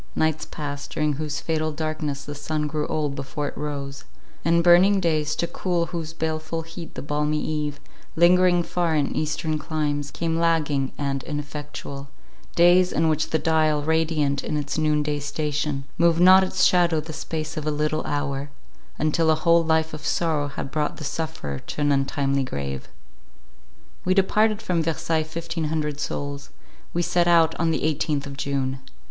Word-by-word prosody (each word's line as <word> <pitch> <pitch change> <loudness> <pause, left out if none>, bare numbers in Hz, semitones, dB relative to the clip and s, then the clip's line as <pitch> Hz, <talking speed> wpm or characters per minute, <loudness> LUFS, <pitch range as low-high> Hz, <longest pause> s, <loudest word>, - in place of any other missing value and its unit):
Nights 160 -1 +1
passed, 145 -1 -5
during 150 -1 0
whose 150 +2 -3
fatal 155 -1 -1
darkness 155 -2 -3
the 145 - -6
sun 150 +1 -2
grew 150 0 -2
old 150 -2 -1
before 140 +1 -4
it - - -12
rose; 145 -1 -5 0.4
and 170 0 +3
burning 180 +3 +6
days, 155 -4 +1
to 170 - 0
cool 170 0 -1
whose 165 -2 -3
baleful 160 0 -3
heat 165 +1 -9
the - - -5
balmy 150 +1 0
eve, 150 -2 -2 0.4
lingering 175 +1 +5
far 170 -1 0
in 145 -2 0
eastern 155 0 -1
climes, 150 -2 -2
came 165 +1 -2
lagging 150 -5 +1
and 140 -1 -1
ineffectual; 145 -1 -6 0.5
days, 180 +1 +5
in 160 +1 +2
which 155 0 0
the 160 - +2
dial, 155 -2 +2
radiant 155 -3 +1
in 150 - -2
its 145 -1 -3
noon 150 -1 +2
day 150 0 -1
station, 145 -1 -2 0.2
moved 170 -1 +4
not 185 +2 +8
its 185 - 0
shadow 175 -3 +4
the 160 +1 -6
space 155 0 -4
of 155 -1 -4
a - - +3
little 150 +1 0
hour, 145 -1 -2 0.5
until 160 +1 +2
a 160 - +5
whole 170 +1 +4
life 160 0 +1
of 155 -1 -7
sorrow 155 -2 0
had 135 -1 -6
brought 150 0 -1
the - - -7
sufferer 150 - -4
to - - -7
an 145 0 +2
untimely 140 0 +1
grave. 70 - -4 1.2
We 185 +1 +2
departed 215 +3 +2
from 180 -5 +1
Versailles 160 0 0
fifteen 165 +1 -4
hundred 150 -1 -2
souls. 145 -1 -4 0.4
We 175 - 0
set 175 0 +2
out 165 -2 +5
on 165 0 +2
the 160 - 0
eighteenth 150 -2 0
of 140 -1 -7
June. 135 -1 -2
155 Hz, 170 wpm, -24 LUFS, 145-165 Hz, 1.2 s, not